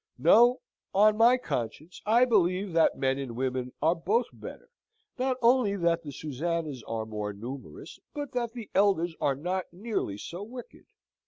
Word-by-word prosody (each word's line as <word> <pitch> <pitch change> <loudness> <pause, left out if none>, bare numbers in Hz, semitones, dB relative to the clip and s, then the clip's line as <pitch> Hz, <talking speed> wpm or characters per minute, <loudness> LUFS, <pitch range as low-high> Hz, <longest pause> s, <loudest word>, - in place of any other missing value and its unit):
No: 230 - +5 0.3
on 210 +2 +5
my 235 +3 +5
conscience, 150 - -5
I 235 +4 +5
believe 190 -4 +1
that 165 -1 +3
men 135 0 0
and 130 -4 -5
women 130 0 -2
are 160 +2 +4
both 205 +8 +1
better; - - -11 0.5
not 260 0 0
only 235 -4 +4
that 170 -3 +1
the 145 - -8
Susannas 155 0 -3
are 115 -1 -3
more 105 -1 -4
numerous, 125 +7 -9 0.2
but 290 -1 -4
that 240 -2 -2
the 235 -4 -9
Elders 185 -4 +2
are 140 - +2
not 180 +6 -3
nearly 185 - -3
so 170 - -7
wicked. 240 +3 -10
175 Hz, 160 wpm, -28 LUFS, 135-225 Hz, 0.5 s, No